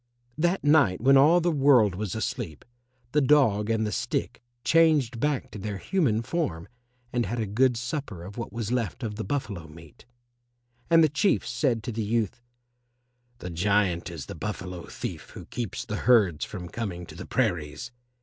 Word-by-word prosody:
That 175 +5 0
night 145 - +4
when 135 +4 +5
all 155 +6 +6
the 175 +1 +2
world 135 - +4
was 100 +1 -4
asleep, 110 - -4 0.5
the 150 - +3
dog 125 -7 +3
and 110 -1 +1
the 105 - -2
stick - - -2 0.2
changed 155 -8 +3
back 145 0 -1
to 105 - -8
their 100 0 -4
human 115 - 0
form 115 - -2 0.5
and 120 -1 0
had 120 - -3
a 110 - 0
good 120 +4 +2
supper 120 - -4
of 100 +3 -9
what 115 - -5
was 115 -1 -4
left 125 +1 -2
of 110 -2 -3
the 110 +1 -5
buffalo 105 - -3
meat. 80 +6 -15 0.8
And 165 -1 +6
the - - +6
Chief 170 +8 +1
said 120 -7 0
to 120 - -4
the 110 0 -3
youth, 110 +1 -1 1.0
"The 90 -6 -7
giant 90 0 +1
is 80 -5 -7
the - - -7
Buffalo 90 -1 -6
thief - - -6
who - - -8
keeps 120 -6 -5
the 105 - -4
herds 105 -11 +3
from 90 -4 -7
coming 90 -6 -5
to 80 - -12
the 85 - -9
prairies. 95 - -1
115 Hz, 180 wpm, -27 LUFS, 95-135 Hz, 1.0 s, all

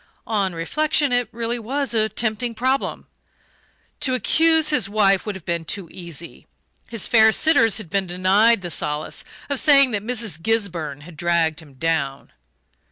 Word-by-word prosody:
On 200 -5 -1
reflection, 290 - 0
it 245 -3 +1
really 235 +1 -3
was 270 +4 -2
a 220 -1 +1
tempting 230 +1 -2
problem. 260 +4 -1 0.9
To 255 -2 +1
accuse 320 +3 +2
his 200 -10 +1
wife 200 -1 +2
would 210 - -3
have 190 - -11
been 170 -2 -2
too 190 +2 -4
easy 170 -2 -8 0.4
his 230 -4 -2
fair 220 -1 +5
sitters 230 -5 +3
had 185 -7 -6
been 195 -1 0
denied 190 +4 +3
the 175 - -5
solace 150 0 -2 0.2
of 280 -2 -1
saying 275 -4 +5
that 205 -2 -1
Mrs. 220 -7 -2
Gisburn 170 -10 -2
had 165 +2 -13
"dragged 170 -2 +1
him 145 -4 -17
down." 140 -2 -2
210 Hz, 160 wpm, -21 LUFS, 170-240 Hz, 0.9 s, fair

